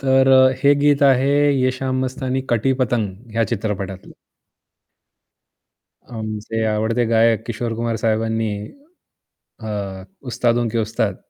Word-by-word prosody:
तर 130 0 +3
अ, 130 0 +6
हे 140 +1 +6
गीत 145 -1 +3
आहे 135 +1 +2 0.3
"ये 130 0 +2
शाम 130 -1 -1
मस्तानी" 130 0 -3
"कटी 120 +3 +2
पतंग" 110 -2 -3
ह्या 115 +1 +1
चित्रपटातलं. 95 -3 -5 1.9
आमचे 110 -1 -4
आवडते 110 +3 0
गायक 115 0 +3
किशोर 120 0 -3
कुमार 115 0 -2
साहेबांनी 110 -1 -1 1.1
अ, 100 -3 -5 0.2
उस्तादों 120 0 0
के 115 +1 -2
उस्ताद 110 -2 -1
115 Hz, 115 wpm, -20 LUFS, 110-130 Hz, 1.9 s, अ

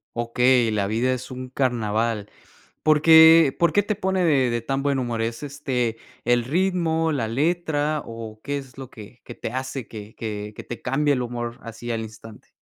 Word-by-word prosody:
Okey, 120 +1 +3
La 105 -2 0
vida 115 +5 0
es 130 0 -4
un 130 0 -7
Carnaval. 115 -4 -1 0.5
¿Por 155 -1 +3
qué 160 -2 +8
por 170 -2 +3
qué 205 - +3
te 215 - -1
pone 190 -2 0
de 135 -6 +3
de 120 0 -1
tan 135 +3 -2
buen 140 -1 0
humor? 120 -3 -2
¿Es, 115 +3 -3
este, 130 -5 -2 0.3
el 120 0 +2
ritmo, 165 0 +1
la 125 -7 -1
letra 150 +2 0
o 115 -1 -8
qué 145 0 -2
es 135 -2 -10
lo 130 -2 -8
que 110 +2 -13
que 120 - -10
te - - -5
hace 130 -1 -4
que 105 -1 -10
que 105 -1 -5
que - - -8
te 120 - -8
cambie 145 +2 +1
el 125 - -1
humor 120 -1 -5
así 115 +1 -7
al 115 - -2
instante? 110 0 -11
125 Hz, 195 wpm, -23 LUFS, 115-145 Hz, 0.5 s, qué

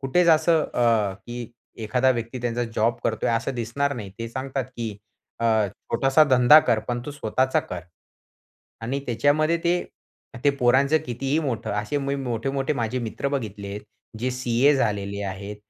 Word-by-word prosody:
कुठेच 170 +6 +2
असं 160 0 +5
अ, 115 -5 +2
की 120 -1 -6 0.3
एखादा 125 +4 +2
व्यक्ती 120 +1 -3
त्यांचा 120 0 -1
जॉब 115 +2 +2
करतोय 110 +1 0
असं 130 +3 -1
दिसणार 125 +5 -1
नाही. 105 -6 -7
ते 115 0 -4
सांगतात, 130 +2 -3
की 115 -4 -4 0.4
अ, 110 -2 +3
छोटासा 135 +8 +2
धंदा 125 +4 +8
कर, 115 -6 +1
पण 120 0 -1
तू - - -4
स्वतःचा 130 -1 0
कर. 90 -1 -6 1.0
आणि 130 +5 -2
त्याच्यामध्ये 145 +7 +2
ते 175 +1 +2 0.6
ते 145 - +6
पोरांचं 135 +5 +4
कितीही 135 +5 -1
मोठं 130 -7 -3
असे 105 +8 -1
मी 140 0 -2
मोठे-मोठे 135 +3 -2
माझे 120 -1 -2
मित्र 120 +4 -3
बघितलेत 105 -6 -4 0.4
जे 130 +2 -1
सीए 125 +3 +2
झालेले 100 -4 -1
आहेत, 100 +2 -6
120 Hz, 155 wpm, -24 LUFS, 115-135 Hz, 1.0 s, धंदा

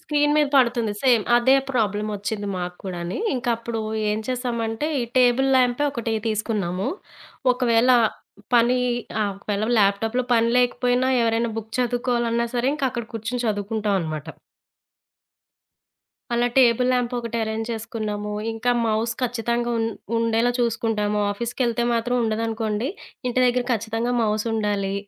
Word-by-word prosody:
Screen 295 -2 +1
మీద 300 -1 +4
పడుతుంది. 235 -4 +3
Same 245 -5 +4
అదే 260 +3 +5
ప్రాబ్లమ్ 215 -3 0
వచ్చింది 205 +1 -4
మాకు 180 0 -4
కూడాని, 175 -1 -4 0.2
ఇంకా 245 -1 -1
అప్పుడు 230 -1 -4 0.3
ఏం 210 - 0
చేసామంటే, 240 0 -2
ఈ - - 0
టేబుల్ 250 +2 +4
లాంపే 250 +3 +2
ఒకటి 230 -4 -2
తీసుకున్నాము. 210 -3 -1 0.6
ఒకవేళ 245 -1 +3 0.6
పని 240 +1 +4 0.4
ఆహ్, 205 -1 0
ఒకవేళ 205 +1 -2
ల్యాప్టాప్‌లో 220 +5 +2
పని 230 0 +3
లేకపోయినా, 250 +1 +2
ఎవరైనా 230 0 +1
బుక్ 220 0 -8
చదువుకోవాలన్నా 240 -1 0
సరే 245 +2 +1
ఇంకా 275 -3 0
అక్కడ 235 -1 -4
కూర్చొని 225 +3 -3
చదువుకుంటాం 210 0 -1
అన్నమాట. 155 -2 -5 2.1
అలా 240 +1 +2
టేబుల్ 250 0 +4
ల్యాంప్ 250 -1 0
ఒకటి 235 -1 -4
అరేంజ్ 220 0 -3
చేసుకున్నాము. 215 -2 -4 0.2
ఇంకా 225 +2 -1 0.2
మౌస్ 220 +1 0
ఖచ్చితంగా 240 0 -1
ఉం 225 - +1 0.3
ఉండేలా 230 +1 +2
చూసుకుంటాము, 215 -3 0
ఆఫీస్‌కెళ్తే 235 +2 -1
మాత్రం 235 +2 0
ఉండదనుకోండి, 220 +1 -1 0.4
ఇంటి 245 - -1
దగ్గర 245 0 +1
ఖచ్చితంగా 225 +2 -1
మౌస్ 215 0 0
ఉండాలి. 205 -3 -1
230 Hz, 130 wpm, -23 LUFS, 215-245 Hz, 2.1 s, అదే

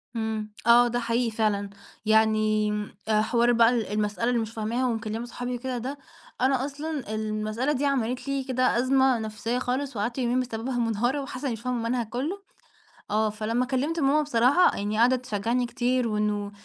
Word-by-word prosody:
إمم. 220 -1 -3 0.2
آه، 240 +1 +7
ده 240 +1 -1
حقيقي 235 0 0
فعلًا. 210 -2 0 0.4
يعني 215 -1 +3
م 210 0 -3 0.2
آآ 215 -1 +3
حوار 235 +2 +2
بقى 230 -1 +6
ال 235 -4 0
المسألة 210 +2 0
اللي 240 -2 +1
مش 220 0 -5
فاهماها 230 +3 -1
ومكلِّمة 225 -1 -2
صحابي 245 +1 -5
وكده 250 +1 -4
ده 265 +4 -4 0.4
أنا 260 0 +2
أصلًا 285 -5 -4
المسألة 215 +5 -1
دي 285 0 0
عملِت 255 -2 -1
لي 275 -1 -1
كده 255 -2 +1
أزمة 260 0 +3
نفسيّة 220 +3 -3
خالص 260 +1 -2
وقعدت 230 +5 -2
يومين 250 -1 +1
بسببها 245 0 -3
مُنهارة 240 +5 0
وحاسّة 270 0 -6
إنّي 255 - 0
مش 225 - -7
فاهمة 250 0 -2
المنهج 235 -2 -1
كُلّه، 300 - -3 0.7
آه، 215 +1 +2
فلمّا 225 +4 -1
كلِّمت 280 +6 -1
ماما 285 +2 +3
بصراحة 280 +5 +3
يعني 210 +2 -2
قاعدة 245 +3 +5
تشجّعني 240 0 -1
كتير 245 0 0
وإنه 210 -1 -1
240 Hz, 175 wpm, -26 LUFS, 220-255 Hz, 0.7 s, آه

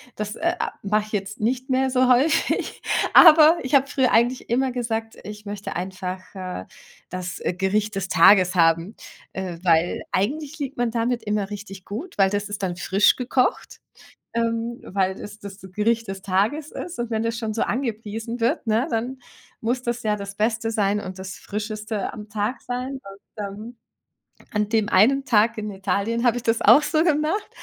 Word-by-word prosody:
das, 210 0 -4
äh, 340 +2 0 0.3
mache 210 +1 +1
ich - - -15
jetzt 200 0 -3
nicht 255 +4 -1
mehr 265 0 +2
so 255 0 +3
häufig. 255 +5 +2 0.3
Aber 320 0 +9
ich 260 +2 +1
habe 275 0 +4
früher 260 -3 +1
eigentlich 240 +2 +2
immer 260 +2 +1
gesagt: 225 -2 -3
„Ich 210 0 -9
möchte 205 0 -6
einfach, 185 +1 -4
äh, 185 - -6 0.4
das, 180 -1 -5
äh, - - -1
Gericht 205 +3 0
des 195 -1 -2
Tages 185 +2 +6
haben,“ 165 +4 +2 0.4
äh, 185 -3 -5
weil 170 -1 +2
eigentlich 295 - -2
liegt 280 -1 -5
man 240 -1 0
damit 235 0 -1
immer 210 -2 -1
richtig 195 -2 -8
gut, 265 - -7
weil 195 -1 +4
das 205 +1 -2
ist 205 -1 -5
dann 175 -2 -2
frisch 195 +3 +3
gekocht, 255 0 -1 0.6
ähm, 230 0 -1
weil 190 -1 0
das 210 +2 -10
das 200 -2 -10
Gericht 230 +3 +1
des 195 0 -5
Tages 210 +12 0
ist. 345 -7 -7
Und 240 -1 -3
wenn 220 0 0
das 230 0 -2
schon 220 -2 -3
so 225 - 0
angepriesen 230 -2 -3
wird, 230 +1 0
ne, 225 +5 +2
dann 245 +4 -2 0.4
muss 245 +3 0
das 240 -1 -3
ja 210 -1 0
das 200 0 -7
Beste 225 +1 0
sein 210 -2 +1
und 190 -1 -7
das 190 -1 -7
Frischeste 215 0 -4
am 210 -1 -9
Tag 210 +4 -2
sein. 250 +2 -4
Und, 195 -2 -11 0.3
ähm, 215 +5 -9 0.8
an 210 -1 0
dem 220 -2 +1
einen 265 +8 +4
Tag 230 -2 +3
in 215 0 -3
Italien 200 +5 -1
habe 240 0 +3
ich 240 - -5
das 225 0 +1
auch 300 - +7
so 310 +1 +2
gemacht, 315 +5 +1
220 Hz, 180 wpm, -23 LUFS, 200-245 Hz, 0.8 s, Aber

